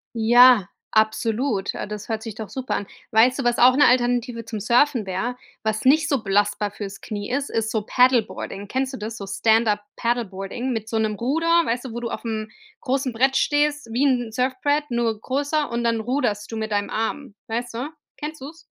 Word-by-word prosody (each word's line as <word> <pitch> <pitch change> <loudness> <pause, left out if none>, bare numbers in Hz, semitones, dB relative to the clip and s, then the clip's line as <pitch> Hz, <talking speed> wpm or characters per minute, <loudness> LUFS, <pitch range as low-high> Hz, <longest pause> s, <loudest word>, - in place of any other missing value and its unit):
Ja, 240 -2 +6 0.2
absolut. 220 0 +1
Ah, - - -4
das 210 +1 -7
hört 220 -1 -2
sich 225 -3 -7
doch 220 -2 -7
super 260 -1 -3
an. 205 - -3 0.3
Weißt 245 +5 +4
du, - - -1
was 240 0 +2
auch 250 +1 +7
'ne 290 - +6
Alternative 245 -1 +1
zum 225 -1 -5
Surfen 240 +2 +2
wäre, 195 +7 -3 0.3
was 220 +1 -1
nicht 310 +5 +4
so 275 -5 +1
belastbar 205 +1 +1
fürs 200 -1 -7
Knie 205 -2 -6
ist, 275 +2 -1
ist 220 -1 -1
so 220 -2 -1
Paddleboarding. 235 -4 +1
Kennst 260 +4 -2
du - - -5
das? 220 +2 -5
So 200 - -7
Stand-up-Paddleboarding 220 +1 0
mit 220 -1 -4
so 225 - 0
'nem 215 -1 0
Ruder, 280 +10 -1 0.2
weißt 240 +3 -2
du, 245 - -6
wo 240 - -5
du 235 - -3
aufm 220 -2 -4 0.3
großen 260 -1 -1
Brett 265 +4 +2
stehst, 295 -1 +1
wie 250 +4 +1
'n 245 -4 +1
Surfbrett, 260 +4 0
nur 235 -2 0
größer, 285 +4 -1
und 235 0 -1
dann 230 -1 +1
ruderst 235 -4 -1
du 225 - -4
mit 220 0 -3
deinem 205 0 0
Arm. 225 +1 -3
Weißt 240 +1 -3
du? 250 +4 -3 0.3
Kennst 305 0 -6
du's? 320 +4 -10
235 Hz, 195 wpm, -23 LUFS, 215-260 Hz, 0.3 s, auch